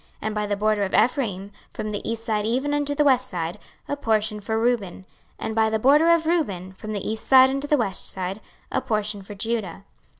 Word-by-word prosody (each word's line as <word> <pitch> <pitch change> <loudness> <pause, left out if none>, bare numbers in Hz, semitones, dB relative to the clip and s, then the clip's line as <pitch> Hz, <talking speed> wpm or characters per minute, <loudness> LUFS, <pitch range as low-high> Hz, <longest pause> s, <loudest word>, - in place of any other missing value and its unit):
26:048:006 - - -31
And 215 0 -2
by 210 0 -1
the 205 -1 -1
border 210 0 +1
of 190 - -3
Ephraim, 205 -7 +1 0.2
from 215 - -4
the 205 - -4
east 230 0 -4
side 215 -2 0
even 260 +7 0
unto 290 0 0
the 295 - +3
west 255 -3 +3
side, 170 -5 -4 0.3
a 285 - -1
portion 215 -5 0
for 220 +2 -2
Reuben. 230 -6 +1
26:048:007 190 - -14 0.4
And 220 - -3
by 220 -1 +3
the 220 - +1
border 290 +8 +5
of 335 -1 +4
Reuben, 200 - -1
from 215 +3 -7
the 200 - -4
east 220 +1 -3
side 260 0 +7
unto 275 +2 -3
the 295 - +3
west 200 -7 -2
side, 190 +2 -4 0.3
a - - 0
portion 215 -4 -2
for 205 +2 -10
Judah. 210 -4 -3
220 Hz, 230 wpm, -24 LUFS, 205-260 Hz, 0.4 s, side